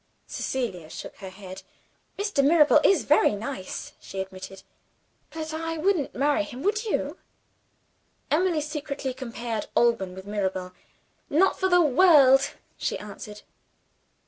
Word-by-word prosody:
Cecilia 190 -12 -4
shook - - -9
her 190 - -8
head. 190 0 -10 0.6
"Mr. 405 -8 +1
Mirabel 300 0 +6
is 385 -5 +4
very 290 -7 +4
nice," 210 -2 -6
she 195 - -7
admitted; 190 0 -7 0.7
"but 315 -1 -6
I 325 +1 -3
wouldn't 340 -2 0
marry 290 +4 +2
him. 275 -3 -7
Would 425 +3 0
you?" 430 - -2 1.1
Emily 330 0 +2
secretly 290 -3 -4
compared 235 -3 -5
Alban 230 -6 +2
with 190 0 -9
Mirabel. 190 -3 -3 0.6
"Not 370 +6 +3
for 375 - +2
the 355 -1 +5
world!" 280 -3 +5 0.3
she - - -1
answered. 210 0 -10
270 Hz, 125 wpm, -26 LUFS, 205-315 Hz, 1.1 s, Mirabel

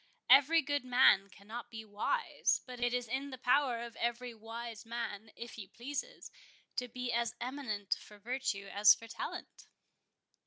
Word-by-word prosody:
Every 315 +3 +7
good 285 0 0
man 245 -6 +5
cannot 215 +5 -9
be 220 -1 -8
wise; 215 - 0
but 250 -1 -8
it 245 0 +1
is 245 -1 -1
in 265 +4 -2
the 260 - -7
power 250 -1 +3
of 235 -1 -8
every 240 +1 -2
wise 225 0 -7
man, 225 -2 -5
if 235 0 -7
he 210 -4 -8
pleases, 285 - -6 0.5
to 250 - -1
be 250 0 -3
as 235 -1 0
eminent 240 -6 -2
for 210 - -14
virtue 220 -3 -2
as 205 +1 +8
for 230 - -12
talent." 230 - -7
235 Hz, 160 wpm, -34 LUFS, 220-255 Hz, 0.5 s, as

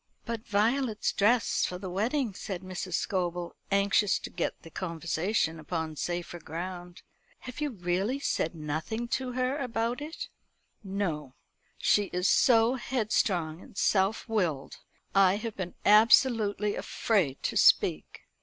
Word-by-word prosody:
"But 230 -1 -5
Violet's 220 +2 +1
dress 230 +3 +2
for 180 - -2
the 190 +1 -7
wedding," 225 +5 0
said 185 -1 -6
Mrs. 185 -1 -4
Scobel, 175 -2 -2
anxious 200 +1 +3
to - - -8
get - - -3
the 165 - -12
conversation 165 0 -1
upon 160 0 -4
safer 175 +2 -4
ground. 175 +3 -7 0.4
"Have 255 +3 -8
you 300 - 0
really 190 +3 -1
said 175 - -1
nothing 155 +10 -3
to 255 0 -2
her 255 +3 -1
about 240 0 -2
it?" 315 +3 -6 0.6
"No. 170 -9 -3 0.4
She 205 - +3
is 180 0 -1
so 230 -1 +5
headstrong 195 -10 0
and - - -15
self 195 +3 +1
willed. 175 - -1 0.4
I 195 -1 +5
have 220 +1 -5
been 180 -2 -5
absolutely 210 -1 +5
afraid 180 - 0
to - - -1
speak. - - +3
200 Hz, 135 wpm, -29 LUFS, 175-230 Hz, 0.6 s, so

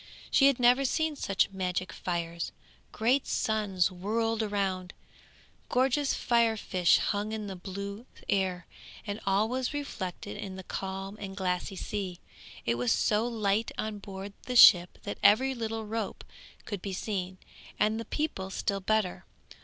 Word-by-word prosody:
She 275 - +6
had 275 -3 +3
never 250 +2 +5
seen 315 +3 0
such 195 -7 +1
magic 185 -1 -2
fires. 170 -1 -3 0.4
Great 250 +5 +2
suns 200 -4 +1
whirled 225 +5 -1
round, 195 -4 -2 0.7
gorgeous 265 +3 +2
fire 235 -2 +2
fish 180 -4 +3
hung 210 +1 -1
in 215 -1 -3
the 195 -2 -5
blue 200 +5 -6 0.2
air, 185 -3 0 0.4
and 205 +1 -4
all 195 +3 +3
was 255 +4 -2
reflected 205 -9 -5
in 200 -2 -6
the 190 - -8
calm 195 +2 -5
and 195 0 -7
glassy 185 0 -1
sea. 190 -2 -4 0.5
It 120 0 0
was 125 -1 +1
so 215 +2 +2
light 220 -2 0
on 215 -1 -3
board 195 0 -8
the 250 - -2
ship 180 -7 +8
that 205 - -5
every 255 +7 +5
little 225 -2 -3
rope 220 -1 -4 0.4
could 205 -4 -4
be 195 -1 -4
seen, 185 -2 -3 0.4
and 215 +2 +2
the 230 - -5
people 245 -11 -2
still 195 +1 -1
better. 210 -2 0
205 Hz, 150 wpm, -29 LUFS, 190-225 Hz, 0.7 s, ship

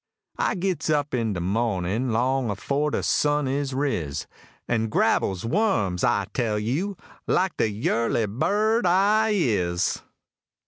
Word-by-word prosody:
I - - +1
gits 180 -4 -2
up 150 -1 0
in 115 -4 0
de 90 - -3
moh'nin', 105 +4 -1
long 125 +2 +1
afore 140 +9 -1
de - - -2
sun 145 -1 +1
is 135 0 -2
riz, 90 - -2 0.4
An' 115 -2 0
grabbles 95 -2 +1
wums, 115 - +1
I 100 -1 +2
tell 115 -4 0
you! 150 - -2 0.3
like 185 0 +1
de 110 - +2
yurly 115 +2 0
bird 210 - +1
I 205 +5 +3
is. 90 - 0
125 Hz, 135 wpm, -25 LUFS, 105-165 Hz, 0.4 s, I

